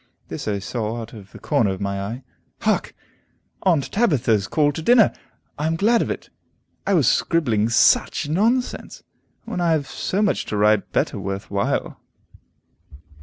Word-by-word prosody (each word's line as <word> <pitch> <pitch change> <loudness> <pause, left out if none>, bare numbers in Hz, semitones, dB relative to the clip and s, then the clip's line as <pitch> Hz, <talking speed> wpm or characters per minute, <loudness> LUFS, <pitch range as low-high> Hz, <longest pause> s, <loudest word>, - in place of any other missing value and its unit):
This - - -6
I 105 -1 0
saw 110 +3 -3
out 115 -1 -8
of 100 -3 -12
the - - -11
corner 140 -9 +1
of 95 -1 -3
my 100 0 -2
eye. 115 +6 -5 0.4
Hark! - - 0 0.7
Aunt 165 -8 +1
Tabitha's 120 - +2
call 145 +3 +2
to 155 - -6
dinner. 230 +5 +5 0.5
I 150 - 0
am 165 - 0
glad 225 +7 +3
of - - -2
it. - - -5 0.6
I 200 - +3
was 145 -8 +3
scribbling 120 -10 +2
such 120 +5 +3
nonsense, 225 - -1 0.4
when 180 - -4
I 170 -2 +3
have 150 -3 0
so 195 +8 -2
much 205 - 0
to 105 - -3
write 105 0 +2
better - - 0
worth 95 0 -5
while. 100 0 -1
130 Hz, 165 wpm, -22 LUFS, 105-170 Hz, 0.7 s, dinner